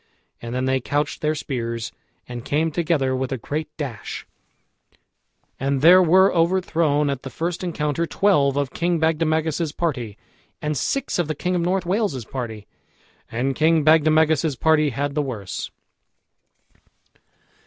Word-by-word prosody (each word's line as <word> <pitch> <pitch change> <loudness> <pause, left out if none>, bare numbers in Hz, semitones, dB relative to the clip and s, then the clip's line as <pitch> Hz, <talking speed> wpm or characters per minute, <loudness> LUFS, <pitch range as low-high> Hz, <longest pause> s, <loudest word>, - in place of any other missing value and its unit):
And 120 +1 -5
then 130 0 0
they 130 0 +1
couched 145 +4 -2
their 155 0 +1
spears, 115 -5 -4 0.4
and 120 -1 -7
came 155 +4 0
together 150 -5 0
with 130 0 -3
a 135 - -1
great 150 +6 -4
dash, 135 -8 -6 1.3
and 135 0 0
there 180 +3 +8
were 185 +3 +5
overthrown 165 -4 +2
at 135 -2 -4
the 135 - -7
first 165 +7 -3
encounter 165 -1 -1
twelve 145 -10 +2
of 140 -2 -1
King 175 0 0
Bagdemagus's 160 0 0
party 125 - -3 0.4
and 150 0 -2
six 275 - -1
of 175 - +1
the 155 - -2
king 180 +5 -2
of 175 - +1
North 185 +2 0
Wales's 180 - -1
party, 110 -5 -6 0.7
and 130 +4 -1
King 160 0 +3
Bagdemagus's 155 -1 +4
party 155 +2 +3
had 140 +3 -2
the 150 - +1
worse. 105 -10 -5
150 Hz, 145 wpm, -22 LUFS, 130-165 Hz, 1.3 s, there